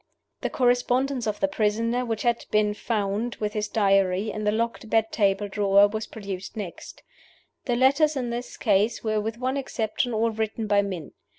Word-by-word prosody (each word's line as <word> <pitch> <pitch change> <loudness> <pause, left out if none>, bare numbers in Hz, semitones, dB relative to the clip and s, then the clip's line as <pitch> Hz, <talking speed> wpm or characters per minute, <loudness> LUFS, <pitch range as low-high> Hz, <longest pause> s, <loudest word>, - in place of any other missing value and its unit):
The - - -1
correspondence 250 0 +1
of 210 - -2
the 290 - +3
prisoner, 230 0 0
which 225 -3 -3
had 235 -1 +1
been 210 0 +2
found, 215 +1 -2
with 210 -1 -3
his 210 -1 -1
Diary, 195 -1 +2
in 215 0 -4
the 210 - +3
locked 225 0 -2
bed 225 0 +2
table 200 -1 +1
drawer, 200 0 +4
was 220 +1 -4
produced 195 -2 -7
next. 195 -5 -8 0.6
The 245 - +1
letters 280 +5 +3
in 250 -3 -2
this 240 +1 -5
case 215 +1 +1
were 215 -1 0
with 220 +2 -4
one 260 +2 -1
exception 245 -2 -2
all 225 +1 +1
written 220 0 -3
by 205 -1 +3
men. 185 -6 -5
220 Hz, 180 wpm, -25 LUFS, 205-240 Hz, 0.6 s, drawer